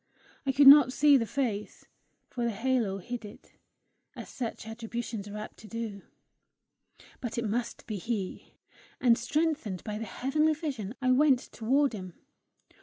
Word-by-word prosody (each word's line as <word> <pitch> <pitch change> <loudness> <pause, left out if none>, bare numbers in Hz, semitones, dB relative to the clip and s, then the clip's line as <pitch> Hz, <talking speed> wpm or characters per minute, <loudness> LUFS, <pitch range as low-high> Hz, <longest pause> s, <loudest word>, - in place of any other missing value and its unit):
I - - +4
could 280 +2 +4
not 275 -2 +10
see 290 +2 +5
the 230 -4 +2
face, 215 -5 -3 0.4
for 240 - -4
the 235 - +1
halo 230 -2 0
hid 235 +5 -6
it, 205 - -13 0.6
as - - -8
such 235 -3 -5
attributions 225 -1 -5
are 205 +1 -7
apt 210 - -8
to 215 - -13
do, 225 -3 -5 1.2
but 240 -3 -5
it 235 - -1
must 235 +3 -3
be 215 - -4
he; 195 -1 -5 0.4
and 240 -2 +5
strengthened 265 - -1
by 210 0 -4
the 225 - -4
heavenly 305 +8 +1
vision, 260 - -5
I 255 - +3
went 270 0 +5
toward 270 +4 +1
him. 185 -4 -7
235 Hz, 155 wpm, -29 LUFS, 210-270 Hz, 1.2 s, not